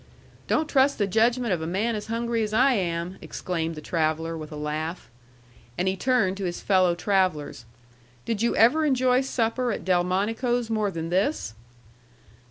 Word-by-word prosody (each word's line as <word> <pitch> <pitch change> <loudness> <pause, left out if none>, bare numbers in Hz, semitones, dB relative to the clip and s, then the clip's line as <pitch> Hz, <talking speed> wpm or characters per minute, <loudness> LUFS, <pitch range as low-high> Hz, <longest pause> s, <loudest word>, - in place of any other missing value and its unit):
"Don't 310 - +1
trust 275 -1 +3
the 205 - +1
judgment 230 +2 +2
of 170 - -2
a 160 - -3
man 205 +7 0
as 210 - -5
hungry 230 0 -1
as 215 0 -2
I 260 +3 +5
am!" 175 -2 -2
exclaimed 165 -2 -4
the 155 - -8
traveller, 160 +1 -1
with 155 -1 -8
a - - -7
laugh. 155 +3 -4 0.7
And 180 - 0
he 190 - +1
turned 195 -4 +1
to 195 - -3
his 175 -1 -3
fellow 185 -3 +3
travellers. 180 - 0 0.6
"Did 225 -2 -2
you 235 - +1
ever 245 +9 +4
enjoy 255 -3 +3
supper 245 -1 -1
at - - -5
Delmonico's 210 +7 0
more 215 -2 +1
than 165 -2 -5
this?" 190 - 0
195 Hz, 170 wpm, -25 LUFS, 170-235 Hz, 0.7 s, I